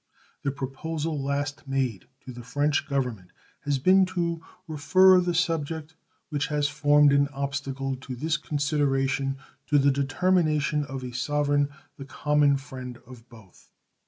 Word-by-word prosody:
The 140 - -1
proposal 145 +3 -4
last 145 +2 -3
made 130 -6 -2 0.2
to 130 - -7
the 120 - -9
French 145 +4 0
Government 125 -10 -2 0.4
has 145 -1 +1
been 185 +7 +4
to 170 -3 -2 0.3
refer 185 +5 +5
the 175 -1 -1
subject 160 -2 -1 0.3
which 145 -2 -1
has 150 -1 0
formed 145 0 +4
an 140 0 +4
obstacle 135 -1 -3
to 130 0 -7
this 155 +5 -1
consideration 140 -2 0 0.3
to 150 - +3
the 140 0 +4
determination 150 +1 +1
of 135 -2 -6
a 125 - -5
sovereign 145 +3 0 0.3
the 135 - -8
common 145 0 +2
friend 130 -2 -8
of 125 -1 -14
both. 110 -7 -18
145 Hz, 140 wpm, -26 LUFS, 135-150 Hz, 0.4 s, refer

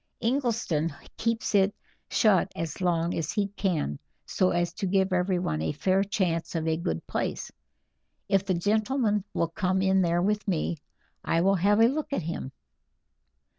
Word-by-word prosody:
Ingleston 230 - 0 0.2
keeps 230 -1 -1
it 200 0 +3 0.3
shut 210 -6 +3
as 165 +1 -4
long 170 -1 +1
as 160 -2 -2
he 200 -1 0
can 175 - -1 0.3
so 185 - +1
as 175 -1 0
to 200 - -3
give 190 0 +2
everyone 180 - 0
a 80 -1 -1
fair 190 +1 +2
chance 180 -5 -1
of 165 -1 -1
a 160 - +2
good 80 - -3
place. - - -3 0.8
If 195 -1 +2
the 190 -2 0
gentleman 210 +2 +1
will 170 - +1
come 185 +2 0
in 190 0 +3
there 175 0 +2
with 210 +2 0
me 170 -2 0 0.5
I 165 - +1
will 195 +2 +4
have 200 +3 +3
a 225 - +7
look 295 +5 -2
at 185 - -1
him." 160 -4 -4
190 Hz, 165 wpm, -27 LUFS, 170-205 Hz, 0.8 s, a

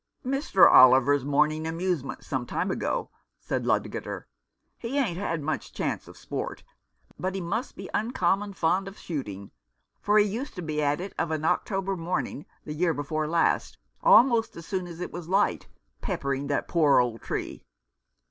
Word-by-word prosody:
" - - -55
Mr. 260 - +5
Oliver's 130 +2 +7
morning 150 +3 +1
amusement 165 -4 -2
some 130 -2 -2
time 185 - -1
ago," - - -2 0.3
said - - -3
Ludgater. - - -2 0.3
" - - -50
He 245 +4 -3
ain't 200 -11 0
had 165 -6 -2
much 155 +2 -3
chance - - -3
of - - -13
sport, - - -5 0.6
but 185 +1 -2
he - - -2
must 200 +9 -3
be 190 - -8
uncommon 205 -3 0
fond 185 +2 +1
of 195 - -9
shooting, 105 - -6 0.5
for 210 +1 +3
he 210 - +6
used 225 +7 -4
to 180 - -5
be 155 -1 -2
at 145 +1 +1
it 190 +2 -6
of 170 - 0
an 155 -1 -2
October 195 +2 0
morning 170 -4 -3 0.2
the 150 - -5
year 165 +1 +1
before 155 +2 -2
last 165 +1 +1 0.2
almost 245 - +5
as 165 - -9
soon 185 -1 -3
as 170 0 -9
it 180 - -4
was 175 -2 -7
light, 195 +2 +1 0.3
peppering 140 - -2
that 145 - -1
poor 155 -5 +4
old 120 -2 0
tree. - - -4
170 Hz, 175 wpm, -27 LUFS, 150-195 Hz, 0.6 s, Oliver's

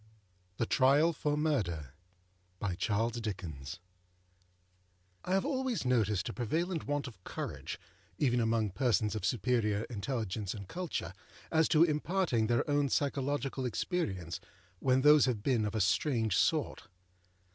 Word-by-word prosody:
THE 115 - +1
TRIAL 140 +7 +4
FOR 150 -1 -1
MURDER. 90 - -1 0.7
I 95 -4 -2
HAVE 90 - -5
always 260 - -1
noticed 110 -7 +1
a - - -4
prevalent 160 - -2
want 145 0 -1
of 110 -9 -10
courage, - - -5 0.4
even 125 -2 +2
among 115 -2 +1
persons 105 -2 +1
of 110 -4 -4
superior 110 -1 +1
intelligence 110 -3 -3
and 100 -3 -8
culture, 160 - -4 0.4
as 160 -1 +4
to 160 0 +5
imparting 155 - +1
their 120 0 +1
own 145 -1 +2
psychological 140 -1 -1
experiences 100 - -2 0.4
when 130 0 +3
those 150 +1 +7
have 110 -5 -1
been 120 -6 +2
of 105 - -3
a - - +1
strange 110 - +1
sort. - - +1
115 Hz, 125 wpm, -32 LUFS, 95-145 Hz, 0.7 s, those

